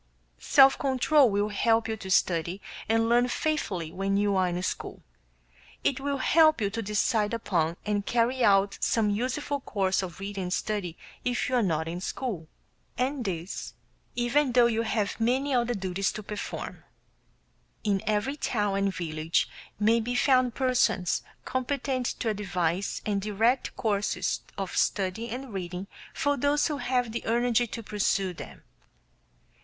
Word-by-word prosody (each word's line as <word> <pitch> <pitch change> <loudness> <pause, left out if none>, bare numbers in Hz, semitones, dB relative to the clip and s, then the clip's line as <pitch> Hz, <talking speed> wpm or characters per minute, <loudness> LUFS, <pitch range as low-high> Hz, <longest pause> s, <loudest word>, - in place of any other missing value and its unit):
Self 270 - +6
control 270 0 +4
will 205 +1 0
help 225 +2 +2
you 220 - -2
to 190 -2 -8
study 175 0 +1 0.3
and 225 0 +3
learn 240 +1 +4
faithfully 225 - -2
when 195 +1 -1
you 205 -1 +2
are 185 -1 +3
in 175 +1 -3
school; - - -4 0.8
it 275 - +1
will 280 0 -1
help 310 +2 +4
you 200 -2 0
to 230 +2 -3
decide 210 +1 +1
upon 170 -7 0
and 205 -1 0
carry 240 +3 +1
out 195 -1 +3
some 215 -3 +2
useful 260 +6 -1
course 195 -7 0
of 185 -1 -7
reading 195 -1 -4
and 180 - -2
study 195 -7 -2 0.3
if 245 0 0
you 255 - 0
are 245 - +4
not 160 -5 0
in 175 +2 -4
school; 190 -7 -4 0.5
and 255 0 -1
this, 180 -1 -4 0.4
even 245 +2 +2
though 245 -1 +6
you 230 -1 +1
have 215 -2 -1
many 260 +5 +1
other 240 -1 +1
duties 190 0 -1
to 215 - -6
perform. 205 0 -6 1.0
In 200 -3 +1
every 215 +7 0
town 205 -7 0
and 195 -1 0
village 160 -1 0 0.3
may 225 +2 +4
be 245 +2 -2
found 255 -2 +3
persons 235 -9 +1 0.2
competent 260 -1 -1
to 230 - 0
advise 185 -3 -1
and 200 -2 0
direct 225 +5 +1
courses 200 -4 0 0.2
of 195 -2 -4
study 200 +4 0
and 250 0 -6
reading 180 0 -4 0.3
for 285 0 0
those 285 +3 +2
who 295 - -2
have 250 -4 0
the 235 - -4
energy 240 +1 +2
to 230 +1 -6
pursue 195 -3 0
them. - - -10
215 Hz, 155 wpm, -28 LUFS, 195-250 Hz, 1.0 s, Self